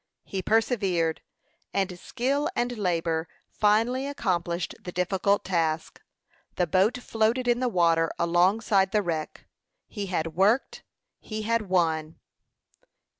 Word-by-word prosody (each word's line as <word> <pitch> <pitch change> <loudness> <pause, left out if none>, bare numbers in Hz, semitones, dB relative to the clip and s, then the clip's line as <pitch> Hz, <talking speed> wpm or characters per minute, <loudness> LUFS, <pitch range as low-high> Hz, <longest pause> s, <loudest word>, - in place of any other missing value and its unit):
He 190 - -4
persevered, 195 -7 +1 0.5
and 190 -2 -1
skill 270 +8 -1
and 245 0 -1
labor 165 -5 -1 0.2
finally 230 +6 +2
accomplished 175 - -2
the 180 - -7
difficult 190 +3 +1
task. 165 -3 -1 0.5
The 180 - +2
boat 190 +8 +2
floated 235 +1 0
in 240 0 +3
the 250 -1 +1
water 165 -4 +2
alongside 190 +3 +2
the 210 -1 +2
wreck. 160 -3 -4 0.4
He 205 -3 -5
had 165 -3 -2
worked; 205 +9 +2 0.4
he 215 -1 -6
had 225 -2 0
won. 160 -3 0
190 Hz, 120 wpm, -26 LUFS, 170-225 Hz, 0.5 s, in